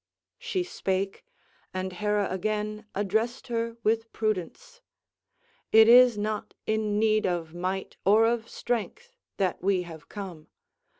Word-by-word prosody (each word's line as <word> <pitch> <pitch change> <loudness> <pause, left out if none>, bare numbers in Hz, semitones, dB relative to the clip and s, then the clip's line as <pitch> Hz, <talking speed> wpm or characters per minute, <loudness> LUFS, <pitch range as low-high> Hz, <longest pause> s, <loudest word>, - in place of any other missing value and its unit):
She 460 -6 -2
spake, 195 - -2 0.5
and 185 0 -3
Hera 210 +2 0
again 210 +2 -2
addressed 220 +6 -1
her 230 0 -2
with 225 +1 +1
prudence: 220 - -3 0.9
"It 220 0 +8
is 245 -1 +8
not 210 0 -3
in 215 -1 0
need 215 -1 +3
of 170 -3 -2
might 185 +2 -3
or 215 +3 +5
of 230 0 0
strength 430 - -4 0.2
that 185 -3 0
we 190 -1 +1
have 165 -3 -11
come. 185 -7 -8
215 Hz, 125 wpm, -27 LUFS, 190-230 Hz, 0.9 s, It